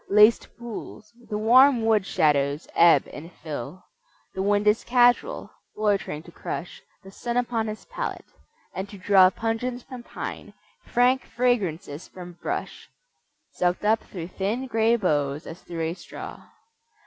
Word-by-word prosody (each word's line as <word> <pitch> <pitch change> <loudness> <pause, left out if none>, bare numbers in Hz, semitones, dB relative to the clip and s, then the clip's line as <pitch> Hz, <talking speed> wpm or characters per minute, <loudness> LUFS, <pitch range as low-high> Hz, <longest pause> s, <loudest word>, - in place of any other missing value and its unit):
Laced 210 +3 +6
pools: 220 -2 -9 0.2
the 210 - -2
warm 240 +2 +5
wood 215 -4 +2
shadows 145 -3 +1
ebb 170 0 +5
and 165 +4 -9
fill. 160 +3 -7 0.5
The 190 - -3
wind 205 +1 +2
is 210 +1 +3
casual, 245 - +2 0.3
loitering 200 -7 0
to 170 - -14
crush 175 +1 -6 0.2
The 195 - -12
sun 240 +4 -3
upon 235 -2 0
his 215 0 -6
palate, - - -5 0.5
and 190 +1 -5
to 200 - -10
draw 190 -1 +6
Pungence 230 +4 -3
from 255 -2 -9
pine, - - -7 0.3
frank 250 +2 +3
fragrances 195 -10 -1
from 175 -1 -11
brush, - - -4 0.6
Sucked 180 +3 -1
up 220 +1 +4
through 170 -3 -8
thin 210 +8 -2
grey 225 -1 +2
boughs 150 -8 0
as 165 - -9
through 170 -1 -6
a 160 +1 -1
straw. 185 - -10
205 Hz, 145 wpm, -25 LUFS, 175-235 Hz, 0.6 s, Laced